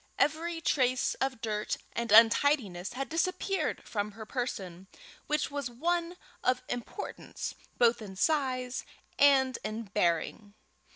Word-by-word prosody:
Every 330 +2 +1
trace 255 -5 +2
of 260 -3 -1
dirt 215 -2 -2 0.2
and 235 -1 -2
untidiness 225 -4 +5
had 270 +2 -3
disappeared 370 +4 -1
from 210 -1 -2
her 220 +1 -8
person, 195 -7 -4 0.4
which 300 -1 0
was 285 -3 -3
one 340 +7 -1 0.3
of 255 0 +1
importance 245 - -5 0.2
both 235 -1 +4
in 195 -3 -8
size 255 0 0 0.4
and 270 -3 +5
in 220 +2 -3
bearing. 200 +1 -1
250 Hz, 120 wpm, -30 LUFS, 215-290 Hz, 0.4 s, untidiness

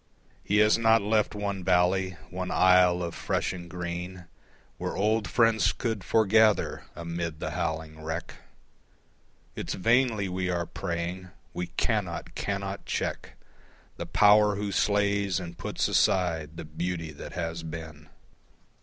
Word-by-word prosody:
He 105 - +1
has 105 +2 +5
not 115 -2 +4
left 105 0 +1
one 100 -2 -3
valley, 90 +1 +2
one 90 0 -4
isle 90 -1 +4
of 85 - -4
fresh - - -1
and 85 -1 -8
green 90 +1 -5 0.5
Where - - -3
old 105 +1 +1
friends 115 0 +3
could 110 -6 -3
forgather 110 -1 +3
amid 85 -2 -4
the - - -3
howling 80 0 -3
wreck. 80 +2 -4 1.2
It's - - -4
vainly 115 0 +2
we 90 0 -2
are 85 -1 -1
praying. 90 +1 -4 0.2
We 90 0 -3
cannot, - - -2
cannot 100 0 -3
check - - -3 0.6
The - - -5
Power 105 0 +5
who 100 0 -3
slays 100 -1 +1
and 85 -1 -7
puts - - -2
aside 80 -4 +1
the 80 - -6
beauty 85 +1 -4
that 70 - -9
has 85 -1 -3
been. 80 -2 -8
90 Hz, 135 wpm, -28 LUFS, 85-105 Hz, 1.2 s, has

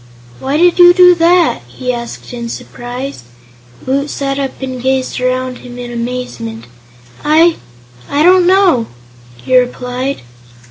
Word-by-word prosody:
"Why 275 +3 -1
did 350 +2 +3
you 350 0 +8
do 360 -1 +7
that?" 345 +1 +3
he 250 -1 -4
asked 235 +1 -7
in 235 -1 -5
surprise. 245 - -7 0.6
Woot 275 +2 -1
sat 275 -1 -3
up 270 -1 -4
and 255 -2 -5
gazed 260 0 -1
around 255 0 -1
him 245 0 -11
in 245 -1 -7
amazement. 235 - -5 0.6
"I 320 +3 +4 0.5
I 290 +2 +1
don't 360 +1 +5
know!" 365 - +3 0.6
he 255 - 0
replied. 250 - -1
260 Hz, 135 wpm, -14 LUFS, 245-320 Hz, 0.6 s, you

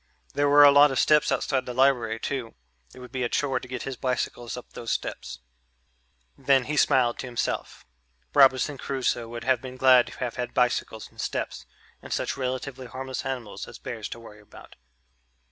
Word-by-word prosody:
There 145 0 +2
were 145 +1 +8
a 145 - +9
lot 145 +1 +7
of 135 - -3
steps 150 -1 +4
outside 130 -2 -1
the 125 - -5
library 120 -4 +2
too 125 -3 -4 0.4
it - - -17
would 125 - -11
be 130 -1 -4
a 120 - 0
chore 140 -5 0
to 125 - -11
get 125 -1 -5
his 135 -2 -5
bicycles 125 -1 -3
up 125 - -11
those 115 - -7
steps. 65 -1 -4 0.9
Then 135 -1 +3
he 150 +4 -3
smiled 130 -5 +3
to 130 - -5
himself. 120 -2 -4 0.5
Robinson 135 +1 +4
Crusoe 130 -3 -2
would 120 +1 -7
have 130 -3 +2
been 130 -1 -9
glad 130 -1 +6
to - - -11
have 125 -2 -4
had 125 0 -4
bicycles 120 -3 0
and - - -8
steps - - -4 0.3
and - - -11
such - - -1
relatively 130 0 -4
harmless 130 +1 -5
animals 125 -6 -5
as - - -11
bears 120 -5 -6
to 115 - -8
worry 105 -2 -13
about. 105 - -15
130 Hz, 190 wpm, -26 LUFS, 120-135 Hz, 0.9 s, a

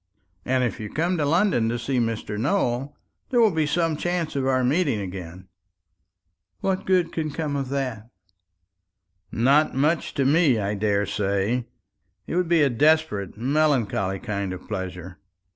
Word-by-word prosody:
"And 130 0 +1
if 120 0 -2
you 105 -1 -5
come 170 +4 0
to 150 - 0
London 160 - +2
to 120 - -1
see 125 +2 -1
Mr. 115 -2 -2
Nowell, 135 - -1 0.3
there 245 - +2
will 225 -3 +5
be 160 -3 0
some 165 +1 +1
chance 175 -1 -2
of 135 -1 0
our 130 -1 +2
meeting 140 - +1
again." 90 -1 -7 1.1
"What 190 0 -1
good 180 -3 +2
can 155 -2 -2
come 150 -1 -3
of 135 -2 -2
that?" 125 -5 -3 1.2
"Not 140 +6 +3
much 155 +5 0
to 135 - +1
me, 145 -3 +4
I 100 -1 -1
daresay. 100 +2 0 0.6
It - - -4
would 180 -2 +1
be 165 -3 +4
a 140 - +3
desperate, 145 - +1
melancholy 125 -7 +1
kind 100 -4 -3
of 90 - -10
pleasure. 95 -3 -6
130 Hz, 155 wpm, -24 LUFS, 105-155 Hz, 1.2 s, will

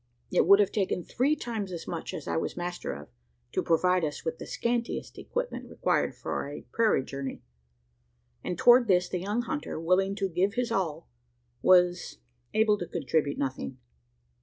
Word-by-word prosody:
It - - +3
would 200 +1 +8
have 205 - +3
taken 190 -3 0
three 275 - +1
times 225 -8 -4
as 170 -2 -6
much 170 - -4
as - - -7
I - - -1
was 160 - -2
master 175 0 -3
of, 75 +1 -8 0.4
to - - 0
provide 180 +2 +2
us 150 -2 -3
with 160 0 -3
the - - -7
scantiest 235 0 -2
equipment - - -4
required - - 0
for 140 - -4
a 145 - -8
prairie 225 -11 +3
journey; 135 0 -6 1.0
and 180 - -3
toward 240 +2 +6
this 180 -2 +3
the 180 - -2
young 205 +6 -1
hunter, 295 - -4
willing 185 +4 +2
to 195 -1 0
give 190 +3 0
his 245 -2 -1
all, 175 - -1 0.5
was 180 -1 +4 0.4
able 215 -1 +4
to 175 - -4
contribute 145 -3 0
nothing. 130 - -3
185 Hz, 170 wpm, -28 LUFS, 165-220 Hz, 1.0 s, would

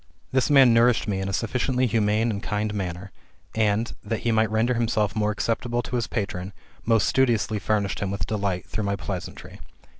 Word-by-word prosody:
This 130 +1 +1
man 135 -4 +7
nourished 120 0 +3
me 100 -2 -1
in 95 0 -3
a - - -2
sufficiently 125 +5 0
humane 110 0 +1
and 100 -2 -4
kind 105 0 -2
manner; 95 -1 -5 0.4
and, 110 +1 +1
that 115 - -3
he 120 - 0
might 110 -1 +2
render 110 +3 +1
himself 110 -3 0
more 105 -1 +1
acceptable 115 +3 -1
to 125 - -4
his 120 -2 -1
patron, 100 -3 -4 0.3
most 115 -5 +2
studiously 115 -5 +1
furnished 105 -2 -1
him 100 - -2
with 95 -2 -3
delight 100 -2 -2
through 110 - -3
my 100 0 0
pleasantry. 95 -3 -7
110 Hz, 185 wpm, -25 LUFS, 100-115 Hz, 0.4 s, man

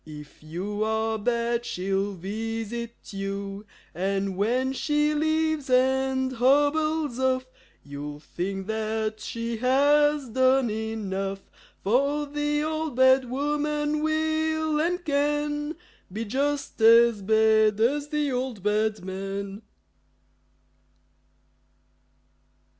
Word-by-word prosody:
If 150 -2 -12
you 190 +7 -4
are 220 0 0
bad, 235 +1 0
she'll 195 -1 -2
visit 225 +5 -5
you. 195 +1 -5 0.3
And 195 +1 -1
when 250 +7 0
she 295 +2 +1
leaves 315 -1 0
and 260 +1 +2
hobbles 290 +2 +2
off 260 0 +1 0.4
You'll 145 +1 -7
think 190 +5 -4
that 220 0 -2
she 230 0 -4
has 285 +3 +3
done 260 0 +3
enough; 195 -3 -4 0.3
For 280 +8 +1
the 295 +1 -1
Old 315 -2 -2
Bad 260 0 +5
Woman 295 +2 -1
will 315 0 0
and 355 +2 -1
can 295 +1 0 0.4
Be 220 +4 -4
just 275 +3 -2
as 230 -1 +6
bad 220 0 +3
as 285 +6 +1
the 295 -2 -1
Old 250 -5 -3
Bad 210 -1 0
Man! 195 +2 -5
240 Hz, 100 wpm, -26 LUFS, 210-295 Hz, 0.4 s, as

